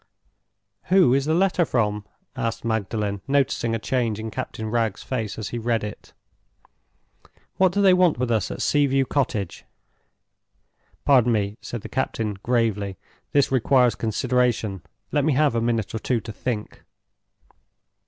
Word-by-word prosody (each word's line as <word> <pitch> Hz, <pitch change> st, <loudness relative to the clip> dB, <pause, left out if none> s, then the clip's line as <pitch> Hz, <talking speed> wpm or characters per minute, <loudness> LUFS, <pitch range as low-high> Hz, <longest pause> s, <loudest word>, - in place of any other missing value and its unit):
"Who 180 Hz, -9 st, +5 dB
is 135 Hz, 0 st, +2 dB
the 155 Hz, +1 st, +1 dB
letter 185 Hz, -1 st, +3 dB
from?" 105 Hz, -7 st, -1 dB, 0.3 s
asked 115 Hz, -3 st, -3 dB
Magdalen, 105 Hz, -2 st, -2 dB
noticing 135 Hz, -4 st, +1 dB
a -, -, 0 dB
change 115 Hz, -2 st, -1 dB
in 110 Hz, 0 st, -5 dB
Captain 110 Hz, +2 st, -5 dB
Wragge's 115 Hz, -4 st, -1 dB
face 110 Hz, -5 st, -3 dB
as 110 Hz, -, -4 dB
he 120 Hz, -, -4 dB
read 115 Hz, -1 st, 0 dB
it. 105 Hz, 0 st, -8 dB, 1.5 s
"What 185 Hz, -1 st, +4 dB
do 200 Hz, +2 st, +1 dB
they 190 Hz, -2 st, +7 dB
want 180 Hz, -5 st, +4 dB
with 125 Hz, -1 st, -1 dB
us 110 Hz, -4 st, +1 dB
at -, -, -4 dB
Sea 145 Hz, -1 st, +3 dB
view 135 Hz, 0 st, +2 dB
Cottage?" 110 Hz, -9 st, -2 dB, 1.4 s
"Pardon 125 Hz, -4 st, +5 dB
me," 105 Hz, -2 st, 0 dB
said 120 Hz, -, -6 dB
the -, -, -8 dB
captain, 110 Hz, -5 st, -2 dB
gravely, 105 Hz, -6 st, 0 dB, 0.3 s
"this 140 Hz, -2 st, +3 dB
requires 125 Hz, -1 st, +3 dB
consideration. 115 Hz, -3 st, 0 dB, 0.3 s
Let 145 Hz, -, +2 dB
me 155 Hz, 0 st, +2 dB
have 145 Hz, -1 st, +3 dB
a 115 Hz, -, 0 dB
minute 115 Hz, -3 st, -1 dB
or 110 Hz, -, -2 dB
two 120 Hz, +2 st, 0 dB
to 110 Hz, -, -7 dB
think." 110 Hz, 0 st, -5 dB
120 Hz, 155 wpm, -24 LUFS, 110-135 Hz, 1.5 s, they